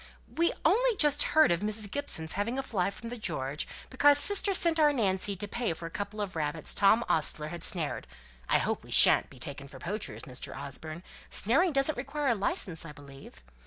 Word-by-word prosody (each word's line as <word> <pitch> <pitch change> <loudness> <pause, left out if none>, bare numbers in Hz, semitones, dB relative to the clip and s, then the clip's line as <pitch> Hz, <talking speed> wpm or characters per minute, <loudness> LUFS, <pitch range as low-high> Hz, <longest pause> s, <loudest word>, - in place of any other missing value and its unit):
"We 335 +1 +2
only 465 +7 +3
just 295 -4 +3 0.2
heard 315 - +6
of 170 - +1
Mrs. 210 0 -3
Gibson's 220 - -1
having 220 +6 -2
a 270 - -2
fly 195 -8 -1
from 230 +3 -9
the 245 0 -7
'George,' 150 -7 -3 0.2
because 285 +2 +5
sister 400 +6 +3
sent 335 -3 +4
our 300 -1 +5
Nancy 200 -6 +1
to 205 +2 -5
pay 235 -3 -2
for 165 - -9
a 165 - -7
couple 205 +3 -6
of 195 -3 -5
rabbits 155 0 -1
Tom 215 +4 +3
Ostler 155 -1 +1
had 170 0 -7
snared, 170 -7 -1 0.4
(I - - +4
hope - - -2
we - - -15
shan't - - +5
be - - -15
taken 140 +1 -7
up - - -14
for 135 - -12
poachers, 205 +10 -6
Mr. 130 -3 -6
Osborne 155 +4 -5 0.3
snaring 325 - +2
doesn't 275 -1 +1
require 275 +2 -2
a - - +4
licence, 190 -5 -2
I 155 -2 -10
believe?) 140 - -14
205 Hz, 205 wpm, -29 LUFS, -, 0.4 s, heard